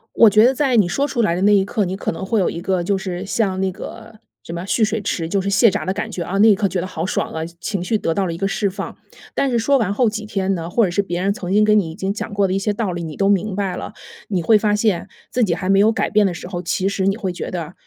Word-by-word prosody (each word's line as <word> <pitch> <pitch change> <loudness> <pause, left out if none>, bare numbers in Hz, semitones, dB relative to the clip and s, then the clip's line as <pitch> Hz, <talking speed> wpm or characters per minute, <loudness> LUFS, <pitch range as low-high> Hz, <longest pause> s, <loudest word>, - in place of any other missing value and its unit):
我 230 - +7
觉 215 +2 +5
得 250 - +5
在 265 -2 +1
你 210 -5 +5
说 275 +11 0
出 240 -4 0
来 170 -6 +2
的 180 - -2
那 205 +1 +5
一 195 -1 +4
刻， 205 0 -1
你 185 +2 -3
可 - - -3
能 180 - -6
会 220 +3 0
有 190 - +2
一 170 - -6
个， 185 0 0
就 195 +3 0
是 185 -1 -5
像 195 -2 -1
那 190 - 0
个 225 +4 -10 0.3
什 - - -8
么 170 +1 -4
蓄 220 +3 +2
水 220 +1 -1
池， 185 -4 -2
就 195 +4 0
是 195 - -3
泄 200 +3 +5
闸 - - -3
的 190 - +1
感 210 +2 -4
觉。 185 - -4
啊， 180 +3 -3
那 220 +2 +7
一 - - +6
刻 195 0 0
觉 180 -1 -2
得 - - -3
好 175 -2 -4
爽 - - -2
啊， 160 0 -3
情 170 0 -14
情 200 -4 -2
绪 220 - +1
得 165 -5 -1
到 195 +2 0
了 170 - -2
一 - - -5
个 195 +3 -1
释 200 +1 0
放。 195 +1 -6 0.4
但 275 - +1
是 240 - +1
说 275 +5 +3
完 205 -5 0
后 235 +1 +2
几 215 0 -5
天 195 -2 -1
呢， 165 -2 -4
或 230 +5 +2
者 185 - 0
是 175 - +1
别 175 -3 -3
人 200 +1 +2
曾 200 -5 -6
经 210 +2 +4
跟 210 0 +5
你 175 -6 -1
已 - - -9
经 195 +1 -2
讲 210 0 -6
过 200 -1 +2
的 185 - -2
一 195 - +1
些 205 +1 -1
道 205 -3 -2
理， 175 0 -4
你 160 -2 -6
都 195 0 +2
明 200 0 0
白 195 -2 -1
了， - - -7 0.3
你 185 -4 -1
会 215 +5 +5
发 210 -1 +1
现， 210 -5 0 0.2
自 250 - 0
己 180 -5 +1
还 185 +2 -3
没 195 - +5
有 215 +2 +5
改 225 - -1
变 210 -1 +4
的 180 - -1
时 170 - -8
候， 180 -1 -5
其 185 +3 -1
实 195 -1 -1
你 195 - +2
会 195 -5 -3
觉 175 - -5
得， 170 -3 -5
195 Hz, 355 characters per minute, -20 LUFS, 180-215 Hz, 0.4 s, 我